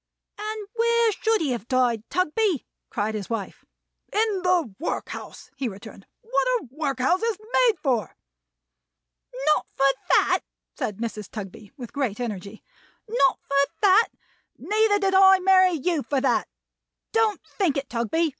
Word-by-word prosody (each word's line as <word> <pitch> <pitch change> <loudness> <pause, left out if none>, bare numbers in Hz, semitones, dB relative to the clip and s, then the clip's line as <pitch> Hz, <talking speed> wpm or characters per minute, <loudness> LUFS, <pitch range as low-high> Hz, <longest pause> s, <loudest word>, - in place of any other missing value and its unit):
"And 425 -1 -5
where 465 -1 +3
should 440 +1 0
he 290 -5 0
have 235 -2 -4
died, 245 -4 +1
Tugby?" 365 - 0 0.2
cried 210 +2 -2
his 210 -3 -5
wife. 225 -4 -5 0.5
"In 420 -2 +1
the 355 - +1
workhouse," 330 - -5
he 265 -3 -2
returned. 200 0 -12
"What - - 0
are 435 - -10
workhouses 310 - 0 0.2
made 480 -5 +4
for?" 240 - 0 1.3
"Not 305 0 +2
for 270 - +2 0.3
that!" - - +3 0.4
said 210 - -3
Mrs. 220 -3 -5
Tugby, 205 -1 -9
with 245 -4 -9
great 255 -7 -2
energy. 210 -3 -6 0.4
"Not 435 -5 +2
for 280 0 +1
that! 405 +3 +6 0.5
Neither 430 -1 +2
did 390 -1 0
I 385 0 +7
marry 370 -1 +5
you 325 0 0
for 275 0 -1
that. 255 -3 +1 0.6
Don't 445 -3 +2
think 360 -9 -1
it, 275 -1 -3
Tugby. 250 +8 0
305 Hz, 140 wpm, -24 LUFS, -, 1.3 s, I